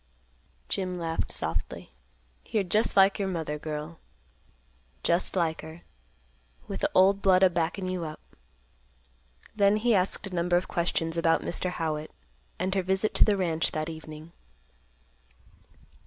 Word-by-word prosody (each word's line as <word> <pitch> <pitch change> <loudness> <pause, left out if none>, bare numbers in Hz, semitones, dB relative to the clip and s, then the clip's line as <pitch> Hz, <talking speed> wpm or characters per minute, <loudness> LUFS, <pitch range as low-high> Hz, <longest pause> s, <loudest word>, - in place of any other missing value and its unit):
Jim 185 -2 -2
laughed 165 -1 -2
softly; - - -4 0.5
"You're 215 -3 -1
just 210 +5 +1
like 195 +1 +5
your 195 - 0
mother, 160 -5 -3
girl. 155 +2 -6 1.0
Just 170 +3 +2
like 165 -3 0
her, 160 +2 -11 0.9
with - - -5
the - - +1
old 195 +1 +5
blood 190 -1 +4
a 185 - +6
backin' 175 +3 -1
you 185 -2 -3
up." 155 -1 -7 1.4
Then 205 0 +4
he 235 +2 +2
asked 190 +1 +1
a 195 - -8
number 175 0 +2
of 180 - -2
questions 170 -1 -1
about 165 -1 +2
Mr. 180 - -1
Howitt, 155 -3 -3 0.5
and 185 +2 -1
her 195 - +1
visit 190 +3 +1
to - - +5
the 210 -2 +2
ranch 165 -3 0
that 155 +1 -2
evening. 155 0 -9
175 Hz, 140 wpm, -27 LUFS, 160-190 Hz, 1.4 s, a